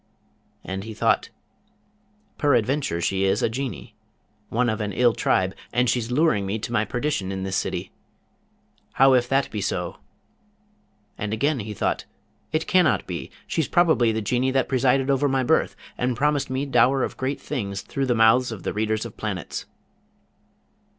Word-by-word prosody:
And 95 +1 -5
he 110 0 -8
thought, - - +1 1.1
'Peradventure 135 - +1
she 95 +2 0
is 95 - +1
a - - +3
Genie, 125 -2 -5 0.5
one 120 +2 +1
of 110 -1 -1
an 105 -1 -3
ill 120 +1 +3
tribe, 95 -3 +1 0.2
and 125 +1 +2
she's 120 -1 0
luring 125 -6 +2
me 100 +3 -1
to 115 - -6
my 110 -2 +1
perdition 120 -5 -2
in 95 -1 -4
this 95 0 -2
city! - - -2 1.0
How 135 0 +5
if 125 -1 +2
that 135 0 +1
be 105 - -3
so?' - - -2 1.2
And 105 0 -2
again 140 +5 +1
he 105 -1 -5
thought, - - -1 0.5
'It 155 +1 0
cannot 155 - +3
be! 85 -2 -5 0.2
She's 160 -4 -1
probably 160 -10 +3
the 110 0 -2
Genie 125 +5 +1
that 135 0 +1
presided 135 +1 +2
over 140 +1 +2
my 135 -1 +1
birth, - - +2 0.2
and 125 -1 0
promised 145 0 +1
me 130 +2 -1
dower 130 0 +3
of - - -3
great 130 +2 -2
things 100 -9 -4
through 135 -1 -2
the 120 - +2
mouths 115 +3 +4
of 110 -5 -7
the - - -2
readers 110 +1 -1
of 115 - -9
planets.' 100 -6 -4
120 Hz, 170 wpm, -24 LUFS, 105-135 Hz, 1.2 s, How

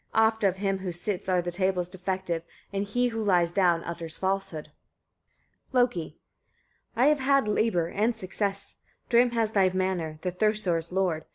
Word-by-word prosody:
Oft 220 0 +3
of 190 -2 +2
him 195 -1 -1
who 190 -1 -4
sits 180 +2 -3
are 180 -1 +2
the 175 - -3
tales 185 -1 0
defective, 185 -2 -3 0.3
and 200 0 -1
he 245 +4 +1
who 225 -1 -3
lies 175 -4 +3
down 175 -3 +2
utters 170 -1 -6
falsehood." 190 -5 -2 1.0
Loki. 245 - +1 0.8
12. 245 +2 +3
"I - - +7
have 300 -1 +2
had 275 -3 +3
labour 210 -5 +1
and 215 +7 0
success: 200 0 -3 0.3
Thrym 240 +1 +5
has 225 -2 +1
thy 195 -3 +4
hammer, 185 -4 -2
the 180 - -1
Thursar's 180 -4 +1
lord. 180 -4 0
190 Hz, 165 wpm, -27 LUFS, 175-215 Hz, 1.0 s, I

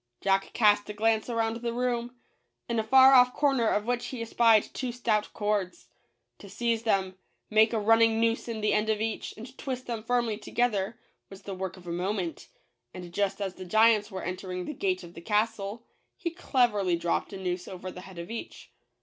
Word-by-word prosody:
Jack 195 0 +1
cast 210 -2 +3
a - - -4
glance 220 +2 +1
around 230 -1 0
the 235 0 -3
room, 245 0 -1 0.5
in 235 -1 0
a - - 0
far 265 +4 +7
off 250 -1 +6
corner 270 -6 +2
of 210 0 0
which 245 0 -1
he 255 - -6
espied 230 -1 +4
two 255 -2 -3
stout 225 -3 0
cords. 205 - -2 0.5
To 200 - -12
seize 230 +3 -1
them, 190 -4 0 0.3
make 220 +1 +5
a 230 - 0
running 225 +1 +4
noose 230 +1 +1
in 225 -2 -4
the 210 - +2
end 210 +1 +1
of 215 -1 +1
each, 220 0 -3
and 245 +4 -10
twist 255 -2 -4
them 230 -2 -4
firmly 235 -2 0
to - - -11
gether, 225 -2 0 0.3
was 195 0 -12
the 200 - -6
work 190 -1 -5
of 180 - -15
a 170 - -5
moment; 180 0 -3 0.5
and 175 -2 -9
just 200 0 0
as 195 -2 -3
the 185 - -9
giants 220 +2 +4
were 190 -3 -6
entering 180 0 -4
the - - -5
gate 190 -7 -1
of 170 0 -11
the 170 - -10
castle, 210 +2 -1 0.3
he 340 - -3
cleverly 235 - +1
dropped 170 0 -1
a 195 - -6
noose 180 -1 -3
over 185 0 -7
the 180 - -10
head 190 -1 -12
of 170 +4 -7
each. 230 - -8
215 Hz, 205 wpm, -28 LUFS, 190-235 Hz, 0.5 s, far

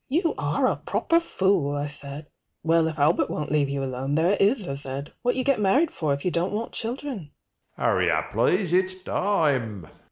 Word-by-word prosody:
You 330 +4 +1
are - - 0
a - - +1
proper 335 - +1
fool, 190 - +1
I 145 0 -2
said. 145 0 -6 0.4
Well, 165 0 +3
if 160 0 -4
Albert 150 +3 +2
won't 150 - -3
leave 145 -2 +2
you 140 0 -2
alone, 135 +2 -2
there 165 +4 +3
it 205 - 0
is, 205 -1 +2
I - - -2
said, 140 0 -5
What 245 0 +1
you 255 - 0
get 275 -5 +2
married 270 - +3
for 155 -3 -2
if 140 +3 -2
you 180 - +1
don't 170 +2 0
want 220 +3 -3
children? 230 - -4
165 Hz, 170 wpm, -25 LUFS, 145-225 Hz, 0.4 s, Well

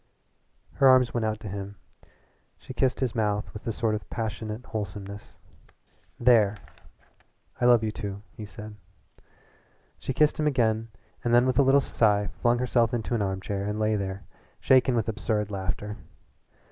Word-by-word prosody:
Her 135 - +4
arms 130 -2 +5
went 115 -2 0
out 110 0 -2
to - - -7
him. 100 +1 -6 0.8
She - - -10
kissed 130 0 0
his 125 -4 0
mouth 105 -3 -1
with 105 +3 -9
a - - +1
sort 110 0 -1
of 105 - -5
passionate 110 +1 -4
wholesomeness. 100 -1 -7 0.8
"There!" 110 -4 +4 1.0
"I - - +3
love 120 -2 +6
you," 105 -2 -4
he 110 - -9
said. 105 0 -10 1.2
She - - -3
kissed 150 +4 +2
him 150 - +2
again 115 -5 +1 0.4
and 120 0 +3
then 120 +1 +5
with 130 0 +1
a - - +7
little 135 +1 +5
sigh 105 -5 +2
flung 120 0 +3
herself 120 -1 +1
into 115 +1 -3
an 115 - +1
armchair 95 0 -2
and 100 - -3
half - - -2
lay 110 0 +2
there, 100 -1 -4 0.4
shaken 130 -1 +4
with 115 -2 0
absurd 105 -1 -1
laughter. 100 +2 -4
110 Hz, 160 wpm, -27 LUFS, 105-120 Hz, 1.2 s, a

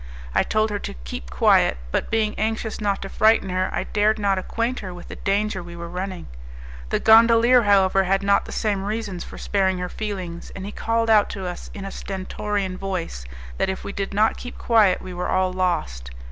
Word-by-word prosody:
I - - +4
told 215 0 +1
her 205 - -2
to - - -6
keep - - -7
quiet, 65 - +3
but, - - -1
being 220 -2 +1
anxious 220 0 -2
not 200 -2 0
to - - -5
frighten 215 -2 +3
her, 185 0 0
I - - -1
dared 215 +1 +1
not 200 -2 +1
acquaint 230 +6 -2
her 185 -3 -7
with 175 - -11
the - - -7
danger 200 0 -1
we 175 0 -10
were 170 0 -7
running. 185 +1 -5 0.6
The - - +1
gondolier, 230 +2 +6
however, 195 -2 +4
had 195 +2 +1
not 200 0 +3
the - - -9
same 205 -3 -1
reasons 205 -4 -3
for - - -10
sparing 190 -2 0
her 180 0 -4
feelings, 185 -6 -5
and 190 - -6
he 205 - -5
called 230 +1 0
out 210 -2 +5
to 190 - -5
us 180 -1 -6
in 200 -2 -6
a 195 - -5
stentorian 195 0 -3
voice 180 - -4 0.3
that, - - +1
if 190 - -4
we 200 - -6
did 195 -1 -3
not 215 +2 +2
keep 245 - -8
quiet, 215 -6 +3
we 185 - -7
were 180 0 -3
all 185 0 +1
lost. 65 - -1
195 Hz, 210 wpm, -23 LUFS, 185-215 Hz, 0.6 s, gondolier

